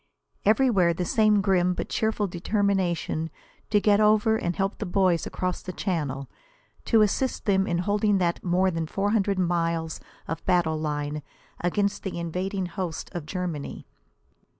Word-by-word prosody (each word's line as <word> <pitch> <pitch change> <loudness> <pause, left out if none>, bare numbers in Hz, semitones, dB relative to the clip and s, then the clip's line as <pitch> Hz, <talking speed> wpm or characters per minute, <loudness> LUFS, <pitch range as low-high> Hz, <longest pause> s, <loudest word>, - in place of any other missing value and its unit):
Everywhere 205 -6 +4
the 180 - -2
same 215 +1 +3
grim 180 -2 +2
but - - -3
cheerful 220 -1 0
determination 185 -3 0 0.4
to 210 - +4
get 205 0 +4
over 215 +1 +4
and 175 -5 -1
help 195 +1 -1
the 215 - -2
boys 180 -2 +2
across 185 -1 -3
the 185 - -6
Channel 145 -9 -2 0.6
to 225 -2 +5
assist 245 +4 -1
in 190 -3 +2
holding 205 +3 +2
that 175 -2 0
more 185 +1 +2
than 165 -2 -2
four 200 +5 -1
hundred 200 -3 +1
miles 170 -2 0 0.3
of 165 - -4
battle 170 -4 +2
line 150 -1 -2 0.4
against 200 +3 0
the 190 -3 -4
invading 185 +3 -2
hosts 175 -2 -5
of 170 -4 -5
Germany. 175 -5 -4
185 Hz, 150 wpm, -26 LUFS, 170-205 Hz, 0.6 s, to